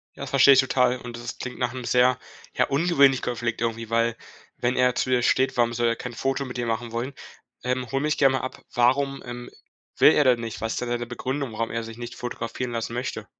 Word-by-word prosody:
Ja, - - -6
verstehe 140 - +6
ich 130 - +5
total. 125 -1 +2
Und 120 -1 -8
das 120 0 -7
klingt 125 - -6
nach 125 -1 -1
'm 125 -2 -6
sehr, 125 +1 +3 0.4
ja, - - +2
ungewöhnlichen 140 -3 +3
Konflikt, 120 -1 -2
irgendwie, 115 -1 -2
weil, 115 0 +1 0.4
wenn 125 +1 0
er 125 -1 +3
zu 130 - -1
dir 125 -1 +3
steht, 130 +2 +2
warum 120 -1 +2
soll 120 0 +1
er 115 - +1
kein 125 +1 -7
Foto 135 +4 -1
mit 125 -1 -7
dir 120 - -2
machen 115 +1 -2
wollen? 120 +4 -3 0.5
Ähm, 125 -1 -2
hole 135 0 0
mich 150 0 0
gerne 135 -2 +4
mal - - -4
ab. 130 - -6
Warum, 135 +3 +2
ähm, 120 0 -7 0.5
will - - +7
er 150 - +4
denn 125 -2 +4
nicht? 115 -2 -5
Was 115 0 -2
denn 125 - -3
seine 120 0 -2
Begründung, 130 +1 -4
warum 115 +1 -2
er 115 0 -2
sich 115 0 -9
nicht 120 0 -7
fotografieren 120 0 -5
lassen 115 0 -3
möchte? 125 +2 -4
125 Hz, 235 wpm, -25 LUFS, 115-130 Hz, 0.5 s, will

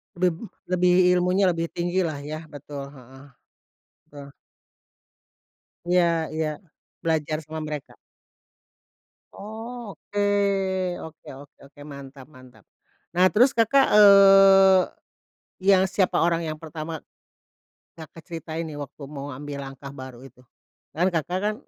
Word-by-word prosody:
Bem 180 +4 -1 0.2
lebih, 180 0 +4
ilmunya 180 +2 +2
lebih 165 0 -3
tinggi 175 +2 -1
lah 155 -6 -2
ya. 155 +2 -7
Betul, 145 -1 -9
heeh. 135 -1 -15 0.9
Betul. 145 -1 -11 1.6
Iya 180 0 +4 0.3
iya. 155 0 -1 0.6
Belajar 155 -2 -1
sama 160 +1 -6
mereka. 150 -2 -7 1.4
Oh, 225 +1 -8
oke 205 0 -3 0.8
oke 160 -1 -12
oke 140 +1 -14
oke. 145 +1 -20
Mantap 140 -2 -11
mantap. 130 -3 -18 0.5
Nah, 180 - +5
terus 250 +6 +4
Kakak, 265 +4 +4
eee, 195 -2 +7 0.8
yang 190 0 +4
siapa 190 -3 +1
orang 170 0 +1
yang 155 0 -4
pertama, 160 0 -7 0.9
Kakak 160 0 -13
ceritain 165 0 -6
nih 155 - -8
waktu 145 0 -9
mau 140 0 -7
ambil 145 +1 -7
langkah 135 0 -9
baru 130 -3 -10
itu? 125 -1 -19 0.5
Kan 175 +4 +2
Kakak 170 +3 -1
kan, 210 +1 0
160 Hz, 120 wpm, -24 LUFS, 145-185 Hz, 1.6 s, eee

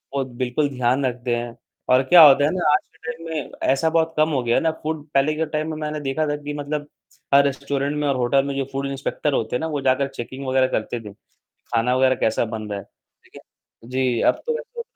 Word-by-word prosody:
वो 135 - +1
बिल्कुल 130 +3 -1
ध्यान 130 0 0
रखते 120 -1 -1
हैं 120 0 -5 0.3
और 130 +1 +5
क्या 175 +5 +7
होता 145 0 +7
है 150 - +1
ना, 175 -5 +1
आज - - +4 0.2
के 160 0 -6
टाइम 165 +1 -11
में 155 -3 -4 0.2
ऐसा 160 +4 +1
बहुत 160 0 +1
कम 155 +1 +3
हो 140 -4 0
गया 120 0 +1
है - - +3
ना। 160 -1 +2
फूड 155 -1 -3
पहले 140 +3 +3
के 160 +1 0
टाइम 155 +1 -3
में 155 - -5
मैंने 150 0 -3
देखा 145 +2 -1
था 145 - 0
कि 145 - -4
मतलब 145 0 -4 0.5
हर 140 0 +7
रेस्टोरेंट 140 +1 -2
में 150 -1 0
और 140 - +1
होटल 130 +2 +2
में 140 - -3
जो 135 -1 -1
फूड 135 0 -3
इंस्पेक्टर 140 +2 -2
होते 115 -2 -1
हैं - - 0
ना, 160 - -1
वो 150 -3 -3
जाकर 135 +1 +2
चेकिंग 135 +1 -7
वगैरह 130 0 +3
करते 120 0 -2
थे, 105 -3 -10
खाना 120 +4 -4
वगैरह 130 0 +4
कैसा 110 0 0
बन 110 -1 -6
रहा 100 -1 -3
है। - - -10
लेकिन - - -20 0.5
जी, 125 -2 0
अब - - +2
तो 470 - +1
वैसे - - -7
140 Hz, 240 wpm, -22 LUFS, 125-150 Hz, 0.5 s, क्या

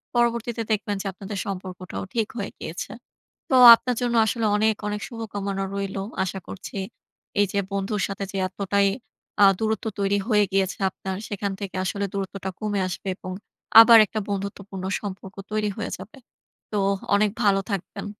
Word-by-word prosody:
পরবর্তীতে 235 -1 +1
দেখবেন 205 -1 0
যে, - - -9
আপনাদের 195 +1 -7
সম্পর্কটাও 185 -2 -6
ঠিক 225 -3 +1
হয়ে 200 - -4
গিয়েছে। 170 +3 -6 0.6
তো 265 - +3 0.2
আপনার 250 +1 -3
জন্য 240 -1 0
আসলে 225 +1 -1
অনেক, 220 +1 +3
অনেক 210 0 -3
শুভকামনা 205 -4 -4
রইলো। 195 0 -3 0.2
আশা 190 +1 -4
করছি 195 +1 -8 0.6
এইযে 200 0 +1
বন্ধুর 200 +1 -1
সাথে 195 0 -5
যে, 195 - -4
এতটাই 200 +1 +1 0.6
আ - - +10
দূরত্ব 220 0 -1
তৈরি 200 0 +2
হয়ে 210 -2 +5
গিয়েছে 195 -1 +1
আপনার 190 0 -6
সেখান 200 -1 -3
থেকে 200 -2 -6
আসলে 200 +2 -1
দূরত্বটা 195 -1 -4
কমে 210 -2 -1
আসবে 185 +2 -6
এবং 185 - -7 0.5
আবার 230 0 +9
একটা 215 +2 -4
বন্ধুত্বপূর্ণ 200 -1 -5 0.2
সম্পর্ক 195 -1 -7 0.2
তৈরি 215 -1 0
হয়ে - - -4
যাবে। 190 +7 -12 0.5
তো 210 - 0 0.4
অনেক 210 0 +3
ভালো 195 -1 +4
থাকবেন। 195 +1 -4
200 Hz, 155 wpm, -24 LUFS, 195-215 Hz, 0.6 s, আ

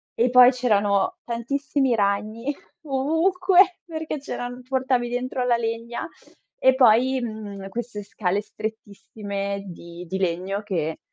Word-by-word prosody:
e 240 +2 +2
poi 250 0 +8
c'erano 205 -6 +1
tantissimi 265 +2 -1
ragni 215 +6 -1 0.3
ovunque, 355 +6 +3
perché 315 -2 -4
c'eran 245 -2 -6
portavi 260 -2 0
dentro 250 +1 -2
la 240 -1 +3
legna. 230 +1 -3 0.5
E 260 0 +5
poi, 255 +1 +4
mhmm, 210 -4 -6
queste 230 -1 -5
scale 200 -2 -1
strettissime 200 -2 -5
di 170 0 -10
di 190 - -3
legno 185 +3 -1
che 165 -6 -2
235 Hz, 120 wpm, -24 LUFS, 200-260 Hz, 0.5 s, poi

